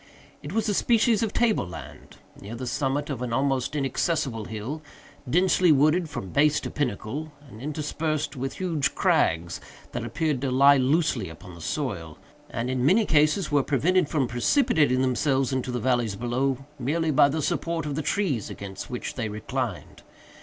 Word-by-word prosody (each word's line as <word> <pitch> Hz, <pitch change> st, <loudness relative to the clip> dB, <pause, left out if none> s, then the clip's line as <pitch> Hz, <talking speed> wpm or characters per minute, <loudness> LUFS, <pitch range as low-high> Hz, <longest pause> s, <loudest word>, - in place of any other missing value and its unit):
It 145 Hz, -, -7 dB
was 220 Hz, +2 st, 0 dB
a 210 Hz, -, +1 dB
species 225 Hz, +1 st, +3 dB
of 225 Hz, -3 st, 0 dB
table 225 Hz, -, +1 dB
land, 90 Hz, -, -10 dB, 0.2 s
near 105 Hz, +4 st, -7 dB
the 130 Hz, +2 st, -5 dB
summit 140 Hz, +3 st, -1 dB
of 130 Hz, -3 st, -4 dB
an 125 Hz, -2 st, -3 dB
almost 135 Hz, +2 st, 0 dB
inaccessible 135 Hz, -4 st, -1 dB
hill, 110 Hz, +9 st, -5 dB, 0.5 s
densely 180 Hz, +2 st, +4 dB
wooded 155 Hz, +4 st, +3 dB
from 95 Hz, -9 st, -6 dB
base 150 Hz, +1 st, +3 dB
to -, -, -5 dB
pinnacle, 145 Hz, +3 st, -3 dB, 0.2 s
and 110 Hz, -3 st, -12 dB
interspersed 155 Hz, +1 st, -2 dB
with 135 Hz, +1 st, -3 dB
huge 165 Hz, -7 st, -1 dB
crags 85 Hz, +1 st, +1 dB, 0.3 s
that -, -, -4 dB
appeared 155 Hz, -6 st, -1 dB
to 135 Hz, -, 0 dB
lie 140 Hz, +2 st, +6 dB
loosely 135 Hz, -, +1 dB
upon 90 Hz, +3 st, -11 dB
the 85 Hz, -, -11 dB
soil, 85 Hz, -, -3 dB, 0.3 s
and 120 Hz, 0 st, -3 dB
in 130 Hz, -1 st, -1 dB
many 195 Hz, -, +4 dB
cases 155 Hz, +3 st, +2 dB
were 145 Hz, -1 st, +4 dB
prevented 155 Hz, +5 st, +2 dB
from 140 Hz, -5 st, +1 dB
precipitating 130 Hz, -, +2 dB
themselves 130 Hz, +1 st, +1 dB
into 130 Hz, -1 st, -2 dB
the 125 Hz, 0 st, -2 dB
valleys 120 Hz, -5 st, +1 dB
below, 130 Hz, +4 st, -1 dB
merely 155 Hz, +5 st, 0 dB
by 140 Hz, 0 st, +5 dB
the 155 Hz, +3 st, -2 dB
support 165 Hz, +1 st, -1 dB
of 145 Hz, -, -3 dB
the 155 Hz, -, -2 dB
trees 155 Hz, -, -1 dB
against 100 Hz, -1 st, -7 dB
which 125 Hz, -, -4 dB
they 115 Hz, -4 st, -3 dB
reclined. 105 Hz, -1 st, -4 dB
140 Hz, 170 wpm, -26 LUFS, 120-155 Hz, 0.5 s, lie